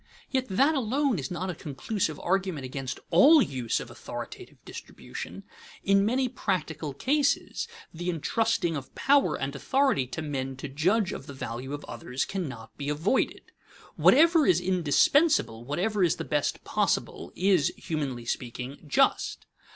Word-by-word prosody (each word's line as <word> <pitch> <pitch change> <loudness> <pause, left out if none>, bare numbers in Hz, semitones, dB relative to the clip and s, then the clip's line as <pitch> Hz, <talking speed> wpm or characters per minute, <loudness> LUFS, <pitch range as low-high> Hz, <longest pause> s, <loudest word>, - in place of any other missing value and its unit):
Yet 260 -1 0
that 270 +11 +3
alone 265 - +1
is 130 - -4
not 180 +1 -3
a - - -5
conclusive 155 +2 -3
argument 185 -6 -1
against 130 0 -5
all 310 +3 +8
use 130 - 0
of - - -8
authoritative - - -8
distribution. - - -8 0.4
In 195 0 +4
many 255 +5 +1
practical 160 - -3
cases 285 - 0 0.3
the 175 +2 -4
intrusting 175 +1 0
of 135 -3 -7
power 280 0 +3
and 135 +1 -3
authority 265 - +1
to 155 +5 -5
men 135 -3 -3
to 130 +3 -6
judge 180 +9 +1
of 135 - -8
the 140 - -8
value 130 0 -5
of 145 0 -5
others 125 +2 -3
cannot 140 - -6
be 140 0 -3
avoided. 160 - 0 0.4
Whatever 325 +1 +5
is 175 - +5
indispensable, 180 - +3
whatever 190 - 0
is 170 - +3
the - - -5
best 145 -1 -1
possible, - - -1
is, 185 -6 +3
humanly 135 -7 -3
speaking, 125 +4 -5
just. 140 - +1
170 Hz, 145 wpm, -28 LUFS, 140-225 Hz, 0.4 s, all